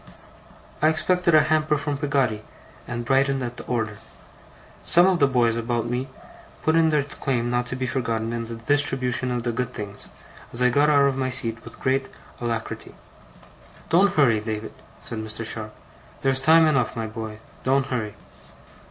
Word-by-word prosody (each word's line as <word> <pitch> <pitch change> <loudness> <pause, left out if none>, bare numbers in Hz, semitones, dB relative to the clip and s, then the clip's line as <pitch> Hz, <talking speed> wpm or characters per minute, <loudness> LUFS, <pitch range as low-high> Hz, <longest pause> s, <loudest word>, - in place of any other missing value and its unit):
I 155 - +5
expected 170 +1 +2
a 155 - +7
hamper 155 0 +2
from 145 0 -2
Peggotty, 135 -7 0 0.4
and 120 0 -4
brightened 135 +1 +2
at 120 0 -5
the - - -6
order. 110 -4 -2 0.8
Some 175 +1 +6
of 185 -2 +3
the 140 - +5
boys 120 -4 +2
about 115 0 -1
me 125 +2 -2 0.6
put 160 - +2
in 165 -1 +4
their 150 -2 +2
claim 130 -4 -2
not 120 0 0
to 130 - -3
be 130 0 -2
forgotten 115 -2 -2
in 115 -1 -3
the 115 - -6
distribution 130 0 +1
of 120 -1 -2
the 120 - 0
good 125 +1 -3
things, 100 -1 -3 0.4
as 120 - -3
I 125 - +4
got 145 +4 +3
out 140 -2 +5
of 135 -1 +1
my 130 -1 0
seat 115 -2 -2
with - - -12
great 135 +1 0 0.3
alacrity. 115 -1 -4 0.9
'Don't 190 +5 +4
hurry, 120 -8 +4
David,' 110 0 -5 0.3
said 115 - -5
Mr. 110 +1 -4
Sharp. 110 -1 -4 0.5
'There's 135 -1 +3
time 160 +4 +6
enough, 135 -6 +1
my 115 -1 -3
boy, 110 -1 -6 0.3
don't 135 +1 +2
hurry. 115 -6 -3
125 Hz, 175 wpm, -24 LUFS, 115-145 Hz, 0.9 s, a